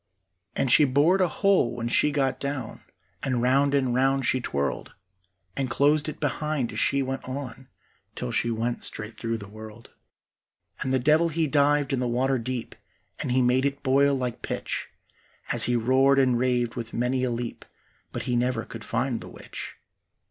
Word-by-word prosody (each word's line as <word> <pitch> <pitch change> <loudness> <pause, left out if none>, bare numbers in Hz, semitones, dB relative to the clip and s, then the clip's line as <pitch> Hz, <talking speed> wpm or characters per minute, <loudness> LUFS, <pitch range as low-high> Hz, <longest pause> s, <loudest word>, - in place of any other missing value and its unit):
And 130 - +1
she 150 - +7
bored 145 +8 +3
a 185 - +4
hole 195 - +2
when 120 -1 -3
she 120 - +3
got 135 -2 0
down, 140 -5 -4 0.4
And 130 -3 0
round 135 +3 +3
and 130 -3 +1
round 135 +1 +2
she 130 +1 +1
twirled, 70 - -3 0.6
And 135 -2 -1
closed 145 +4 +2
it - - -8
behind 150 -3 -1
as - - -3
she 140 0 +2
went 135 0 -4
on, 130 -1 -6 0.5
Till - - -4
she 120 - +1
went 115 +1 -2
straight 105 +1 -6
through 115 -1 -3
the 100 -2 -9
world. 110 +2 -12 0.9
And 130 - -2
the 130 - +3
devil 155 +6 +3
he 160 +1 0
dived 145 -1 +2
in 130 - +1
the 125 - 0
water 130 +2 +1
deep, 120 0 -4 0.5
And - - -2
he 130 +1 +3
made 125 +2 +3
it 140 0 -2
boil 140 +1 +3
like 125 -3 -3
pitch - - -4 0.6
As - - +3
he 125 - +1
roared 130 +4 +3
and 130 -2 +4
raved 120 -1 +1
with 115 -1 -6
many 125 +2 0
a 130 - +1
leap, 120 0 -4 0.5
But - - -4
he 125 -1 -1
never 120 -1 0
could 115 -1 -9
find 125 -3 -1
the - - -9
witch. - - -8
130 Hz, 185 wpm, -26 LUFS, 120-140 Hz, 0.9 s, she